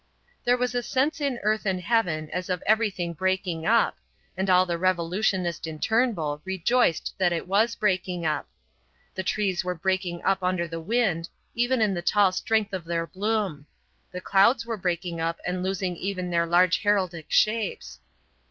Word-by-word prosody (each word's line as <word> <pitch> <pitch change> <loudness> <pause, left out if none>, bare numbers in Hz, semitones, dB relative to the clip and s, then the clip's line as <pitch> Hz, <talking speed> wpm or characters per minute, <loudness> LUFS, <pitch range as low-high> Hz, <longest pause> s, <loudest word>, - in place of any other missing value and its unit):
There 245 +1 +4
was 250 0 -1
a 245 - 0
sense 285 +6 0
in 275 -4 0
earth 215 +1 +1
and 190 -2 0
heaven 175 -7 0
as 180 +1 -4
of 180 -2 -2
everything 200 -6 +1
breaking 185 -1 -1
up, 230 +1 +3 0.4
and 190 +1 -1
all 185 0 +5
the 170 -2 -2
revolutionist 180 -1 0
in 160 -1 -6
Turnbull 175 -9 0
rejoiced 190 +1 +1
that 180 -2 +3
it 170 0 -3
was 220 +5 +2
breaking 185 -4 -1
up. 155 -1 -1 0.6
The 190 - -3
trees 190 -1 0
were 180 0 -2
breaking 180 0 -2
up 195 0 +1
under 180 -1 0
the 165 0 -6
wind, 185 -4 0 0.2
even 240 +1 +1
in 210 -2 +2
the 175 - -3
tall 195 +2 +3
strength 215 +2 0
of 185 -2 -3
their 165 0 -1
bloom: 190 -4 -2 0.4
the 180 - -6
clouds 230 +6 +3
were 230 -1 -3
breaking 175 -3 -2
up 165 0 -2
and 180 0 -2
losing 185 -1 -2
even 185 -1 -3
their 170 0 +1
large 180 +2 +3
heraldic 185 -6 0
shapes. 215 -1 0
185 Hz, 170 wpm, -26 LUFS, 170-215 Hz, 0.6 s, all